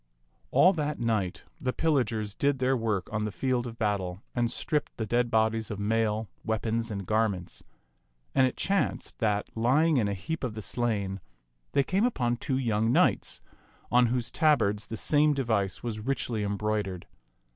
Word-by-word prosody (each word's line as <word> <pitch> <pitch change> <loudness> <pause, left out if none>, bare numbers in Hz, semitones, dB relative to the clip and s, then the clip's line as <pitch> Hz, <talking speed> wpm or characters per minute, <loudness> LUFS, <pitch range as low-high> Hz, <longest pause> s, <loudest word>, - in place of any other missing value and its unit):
All 185 +2 +6
that 150 -3 -2
night 110 -6 -1 0.2
the 130 - -1
pillagers 120 -10 0
did 140 +4 +1
their 130 +1 +2
work 110 -6 -1
on 105 0 0
the 105 - -2
field 125 +2 -1
of 115 -1 -8
battle, 100 -4 -1
and 120 -1 +1
stripped 150 +4 -2
the 110 - -2
dead 120 +2 +1
bodies 110 0 +1
of 105 - -4
mail, 110 +1 0 0.2
weapons, 115 +1 -1
and 100 -3 -4
garments. 105 -4 -1 0.7
And 130 -1 +5
it 125 - -5
chanced 195 -6 -1
that, 105 -2 0
lying 140 +7 +3
in 110 -4 +2
a 100 - -1
heap 160 - -5
of 120 -4 -2
the 110 - -5
slain, 100 -6 -1 0.5
they 140 - +4
came 190 +8 +1
upon 120 - 0
two 130 +1 -1
young 115 -3 +1
knights - - +2 0.5
on 125 0 +5
whose 120 0 -1
tabards 110 -10 +2
the 115 - -5
same 150 +3 +3
device 110 -8 -1
was 115 -3 -3
richly 120 -2 -2
embroid 105 0 -1
ered. 90 -2 -6
115 Hz, 170 wpm, -28 LUFS, 105-130 Hz, 0.7 s, All